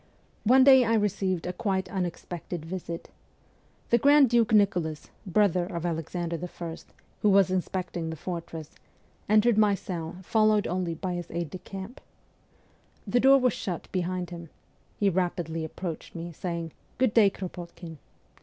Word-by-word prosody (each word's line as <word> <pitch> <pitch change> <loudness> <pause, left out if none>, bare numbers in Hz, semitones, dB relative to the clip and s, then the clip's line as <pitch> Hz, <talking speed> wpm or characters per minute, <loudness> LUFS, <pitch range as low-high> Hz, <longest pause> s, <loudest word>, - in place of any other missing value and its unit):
One 260 +4 +6
day 265 -1 +8
I 230 -1 +2
received 195 -4 0
a 180 - -3
quite 190 -2 -1
unexpected 175 -2 -5
visit. 170 -1 -6 0.8
The 235 - +5
Grand 285 0 +6
Duke 235 -2 +3
Nicholas, 180 -8 +1 0.2
brother 185 -2 +3
of 170 -3 -4
Alexander 170 0 -3
II., 170 -2 -6 0.4
who 210 - +4
was 195 -1 +5
inspecting 180 -2 -2
the 160 - -4
fortress, 165 -2 -6 0.6
entered 215 +1 +4
my 210 -2 +4
cell, 170 -4 -5
followed 215 +1 +3
only 175 -1 -2
by 180 +2 -3
his 175 -1 -5
aide 170 -3 -4
de 185 - -6
camp. 195 +7 -9 1.0
The 235 +4 +2
door 270 +2 +7
was 250 -4 +2
shut 180 -4 -5
behind 180 -1 -2
him. 170 -2 -8 0.5
He 205 - +3
rapidly 175 -3 -1
approached 165 +1 -6
me, 170 +1 -5
saying, 170 0 -4
' - - -35
Good 255 -4 +2
day, 215 -4 +6
Kropotkin.' 175 -4 -8
185 Hz, 150 wpm, -27 LUFS, 170-210 Hz, 1.0 s, day